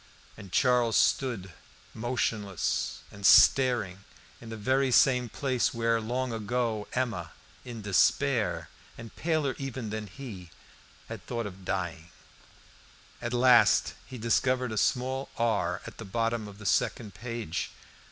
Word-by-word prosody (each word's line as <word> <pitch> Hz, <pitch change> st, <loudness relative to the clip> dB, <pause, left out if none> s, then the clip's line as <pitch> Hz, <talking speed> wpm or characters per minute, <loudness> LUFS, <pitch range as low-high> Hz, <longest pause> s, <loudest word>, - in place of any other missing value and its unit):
And 100 Hz, -4 st, -12 dB
Charles 125 Hz, -2 st, +3 dB
stood, 110 Hz, -9 st, +1 dB, 0.4 s
motionless 110 Hz, -5 st, -2 dB
and 100 Hz, -1 st, -12 dB
staring, 105 Hz, -5 st, +5 dB, 0.4 s
in 115 Hz, -, -10 dB
the 110 Hz, -, -6 dB
very 130 Hz, +5 st, +1 dB
same 125 Hz, -1 st, +4 dB
place 125 Hz, -3 st, -1 dB
where, 115 Hz, 0 st, +1 dB
long 125 Hz, +2 st, -2 dB
ago, 110 Hz, -1 st, -2 dB
Emma, 125 Hz, -3 st, -2 dB, 0.3 s
in 120 Hz, -4 st, -8 dB
despair, 115 Hz, +4 st, +1 dB, 0.3 s
and 115 Hz, -1 st, -10 dB
paler 155 Hz, -5 st, 0 dB
even 130 Hz, -5 st, -5 dB
than 110 Hz, -1 st, -4 dB
he, 95 Hz, -5 st, -9 dB, 0.6 s
had -, -, -8 dB
thought 115 Hz, -2 st, -3 dB
of 95 Hz, -2 st, -9 dB
dying. 85 Hz, -3 st, -3 dB, 1.1 s
At 120 Hz, -, -3 dB
last 125 Hz, -1 st, +5 dB
he 130 Hz, -, -10 dB
discovered 125 Hz, +2 st, +1 dB
a -, -, -3 dB
small 130 Hz, +4 st, 0 dB
R 115 Hz, -3 st, 0 dB
at -, -, -10 dB
the -, -, -5 dB
bottom 115 Hz, +2 st, -1 dB
of 100 Hz, -1 st, -11 dB
the 105 Hz, -, -11 dB
second 105 Hz, +2 st, 0 dB
page. 115 Hz, -3 st, -4 dB
115 Hz, 130 wpm, -28 LUFS, 105-125 Hz, 1.1 s, staring